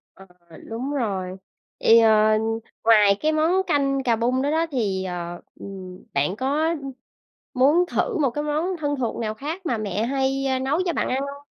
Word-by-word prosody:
Ờ, 195 - -15 0.4
đúng 245 +5 -4
rồi. 195 -8 -2 0.5
Vậy, 230 +1 +6
ờ, 215 -1 +4 0.5
ngoài 210 -3 +5
cái 310 +1 +2
món 330 +5 +2
canh 275 -1 +1
cà 240 -3 +2
bung 245 +3 0
đó 285 - 0
đó 325 +1 +1
thì, 200 -8 -1
ờ, 175 -1 -5 0.2
ừm, 185 -2 -9
bạn 145 +7 0
có, 285 +6 0
ưm, 280 -5 -4 0.6
muốn 295 +8 +4
thử 450 -6 0
một 280 -5 +2
cái 295 +5 -4
món 315 +5 -1
thân 290 -2 -1
thuộc 250 -4 -2
nào 215 -2 -2
khác 315 - -6
mà 240 -8 0
mẹ 210 -1 -2
hay, 270 +1 0
a, 260 -1 0
nấu 275 +6 0
cho 345 - 0
bạn - - -1
ăn 260 - 0
hông? 280 +1 -7
260 Hz, 190 wpm, -23 LUFS, 215-295 Hz, 0.6 s, Vậy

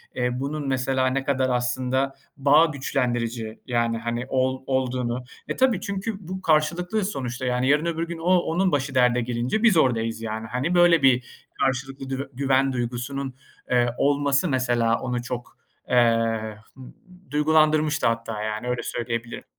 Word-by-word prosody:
eee, 125 -1 0
bunun, 145 +1 -3
mesela, 130 0 +1
ne 135 +1 0
kadar 135 -1 +1
aslında 130 +2 0 0.2
bağ 145 +4 +5
güçlendirici 120 -6 -2
yani, 120 -2 0
hani 120 +1 -3
ol 130 0 0
olduğunu. 125 -2 -1 0.2
E, - - -3
tabii 255 -7 +2
çünkü 200 -1 -4
bu 185 +1 -5
karşılıklıyız 175 +6 +1
sonuçta, 130 -3 -4
yani. 125 +1 0
Yarın 150 +3 +3
öbür 165 0 -2
gün 170 0 -5
o 165 +2 -2
onun 180 +2 +1
başı 135 -1 -1
derde 125 -1 +4
gelince 120 - -1
biz 220 -7 +5
oradayız 115 -5 +1
yani. 110 0 -4
Hani, 130 +10 -1
böyle 175 -2 +5
bir 125 -2 +4 0.3
karşılıklı 135 0 -2
dü 135 +1 -4
güven 135 +1 +2
duygusunun, 125 +3 -3 0.4
eee, 120 -1 +4
olması 140 +3 +2
mesela 120 -4 +1
onu 125 -1 -3
çok, 125 0 -6 0.3
eee, 115 -3 +2 0.5
d 185 0 -20
duygulandırmıştı 155 0 +3
hatta, 115 -2 -2
yani, 110 +2 -3
öyle 125 0 -2
söyleyebilirim. 115 -1 -4
130 Hz, 150 wpm, -24 LUFS, 120-150 Hz, 0.5 s, bağ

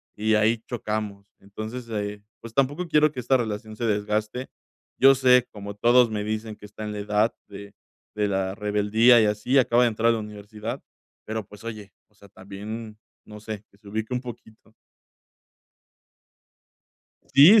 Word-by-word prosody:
y 110 +1 +1
ahí 110 +2 +3
chocamos. 105 -4 -4
Entonces, 110 +5 -7
eh, 105 -1 -4 0.2
pues, 115 -1 -10
tampoco 145 +7 0
quiero 155 -1 +4
que 135 - -7
esta 130 +2 +3
relación 110 -1 -4
se 120 - -2
desgaste. 105 +3 -1 0.5
Yo 135 +1 +7
sé, 125 -1 +5
como 100 -1 -8
todos 120 +2 +5
me 105 -1 -2
dicen, 110 0 -4
que 105 - -14
está 105 +1 -9
en 105 - -4
la 105 - -5
edad 105 +2 +1
de 100 0 -10 0.4
de 105 -1 +1
la 95 -1 -1
rebeldía 105 +3 +4
y - - +4
así, 105 +6 +1
acaba 125 -2 +4
de 120 - +4
entrar 115 +1 +1
a - - +4
la 115 - -1
universidad. 105 +1 -7 0.4
Pero, 110 -1 -4
pues, 105 0 -14
oye, 105 -4 -8 0.2
o - - -34
sea, 100 -1 -17
también, 105 +3 -8 0.3
no 105 0 -11
sé, 110 -1 -7
que 100 - -24
se 105 -1 -18
ubique 110 +4 -3
un 125 - 0
poquito. 110 -3 -12 2.6
Sí, 170 +11 +9
110 Hz, 170 wpm, -25 LUFS, 105-120 Hz, 2.6 s, Sí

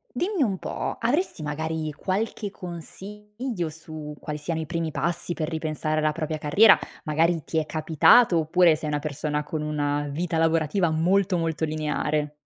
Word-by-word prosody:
Dimmi 360 +4 0
un 195 -7 +1
po', - - -4
avresti 245 - 0
magari 155 +1 -3
qualche 200 +5 -2
consiglio 205 +4 -6
su 155 -1 -8
quali 150 0 -5
siano 160 +2 -2
i 160 - -2
primi 165 +1 -2
passi 170 +4 -1
per 155 -2 -3
ripensare 155 -1 -2
alla 155 0 +2
propria 155 -1 -3
carriera? 195 +9 +6 0.3
Magari 165 +1 +1
ti 160 - -2
è 155 - 0
capitato 165 - +5
oppure, 165 +1 +4
sei 155 0 -4
una 150 0 0
persona 150 0 -2
con 155 +1 -4
una 145 -1 -1
vita 165 +2 -2
lavorativa 165 +2 +2
molto, 180 +4 +2
molto 165 -1 -1
lineare. 150 -1 -1
160 Hz, 160 wpm, -25 LUFS, 150-180 Hz, 0.3 s, carriera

